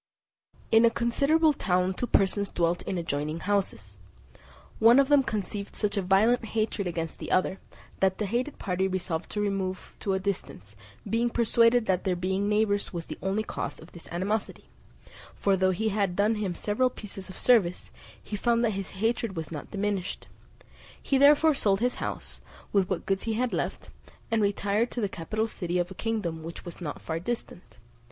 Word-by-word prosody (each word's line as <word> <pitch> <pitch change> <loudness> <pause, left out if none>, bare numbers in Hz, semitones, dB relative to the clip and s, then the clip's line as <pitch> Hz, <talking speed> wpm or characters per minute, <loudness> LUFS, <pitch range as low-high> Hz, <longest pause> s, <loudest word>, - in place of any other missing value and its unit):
In 225 +1 +6
a 230 - +7
considerable 280 +7 +2
town 180 -6 +1
two 245 - -3
persons 200 -1 +2
dwelt 170 0 0
in 185 - -1
adjoining 155 -1 -2
houses. 115 - -1 0.8
One 230 +3 +7
of 275 0 +4
them 290 -1 +6
conceived 205 -4 -4
such 210 -2 -1
a 200 - +1
violent 205 +6 +3
hatred 215 -3 -1
against 165 -2 -4
the - - -6
other, 185 +1 +1 0.4
that 190 -1 +2
the 215 - -1
hated 245 +8 -2
party 190 -1 0
resolved 180 -3 -3
to 210 - -3
remove 195 -2 -2
to 195 - -1
a 190 - +1
distance, 175 - -5 0.3
being 235 +2 +1
persuaded 235 0 +3
that 185 -3 +1
their 185 -2 +1
being 190 +3 -1
neighbours 210 -1 +1
was 170 -2 -5
the - - -8
only 195 +3 0
cause 145 -8 -4
of 160 - -14
this 170 - -13
animosity; 195 +5 -2 0.7
for 200 -1 +2
though 185 0 +2
he 215 +4 0
had 200 -3 0
done 210 +3 +3
him 205 -5 -2
several 215 +8 +1
pieces 200 -5 -9
of 185 - -9
service, 205 -8 +3 0.3
he 210 - -6
found 235 +3 +2
that 225 - +2
his 195 -1 -4 0.2
hatred 230 -3 0
was 160 -1 -5
not 150 -3 -6
diminished; 200 -2 -2 0.7
he 270 - +1
therefore 295 +3 +6
sold 200 -8 +2
his 245 +2 -1
house, - - -4 0.3
with 195 -2 +3
what 185 - -2
goods 195 0 -1
he 225 - 0
had 245 +2 0
left, - - -3 0.4
and 225 -1 +2
retired 205 +3 +1
to - - -4
the 210 - +1
capital 205 +5 -2
city 180 -5 -3
of 175 +1 -1
a - - -5
kingdom 190 -7 -2
which 165 +3 -8
was 175 +1 -9
not 150 -4 -4
far 160 0 -3
distant. 185 -2 -6
200 Hz, 185 wpm, -28 LUFS, 180-225 Hz, 0.8 s, a